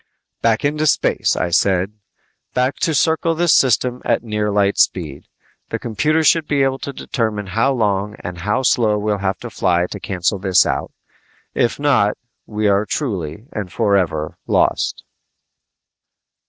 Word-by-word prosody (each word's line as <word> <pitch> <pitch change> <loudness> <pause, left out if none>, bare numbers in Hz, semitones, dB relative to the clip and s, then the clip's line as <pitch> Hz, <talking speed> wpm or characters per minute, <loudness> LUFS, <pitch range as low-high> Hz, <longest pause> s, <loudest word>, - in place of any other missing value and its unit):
"Back 115 +3 +1
into 150 +2 0
space," 130 - +1
I 85 - -1
said. 95 +2 +2 0.6
"Back 125 +2 +1
to 160 - 0
circle 160 +2 +1
this 170 0 +3
system 125 0 +2
at - - 0
a - - -14
near 105 -1 -1
light 100 -1 +1
speed. 75 -7 0 0.4
The - - -2
computers 150 +8 0
should 160 0 +3
be 140 -2 +2
able 135 0 0
to 140 - -5
determine 110 -6 -3
how 125 +7 +2
long 105 -3 -1
and 90 0 -6
how 105 +9 -1
slow 110 -4 +2
we'll 105 -1 -1
have 95 -1 -1
to 120 - -7
fly 90 -3 +1
to - - -6
cancel 95 +1 -1
this 95 -1 +3
out. - - -2 0.6
If 120 - 0
not, 130 -8 +2 0.3
we 105 -1 -1
are 100 0 +3
truly 100 - -4
and 100 -5 -5
forever 90 -7 0
lost!" - - +1
105 Hz, 155 wpm, -19 LUFS, 95-130 Hz, 0.6 s, this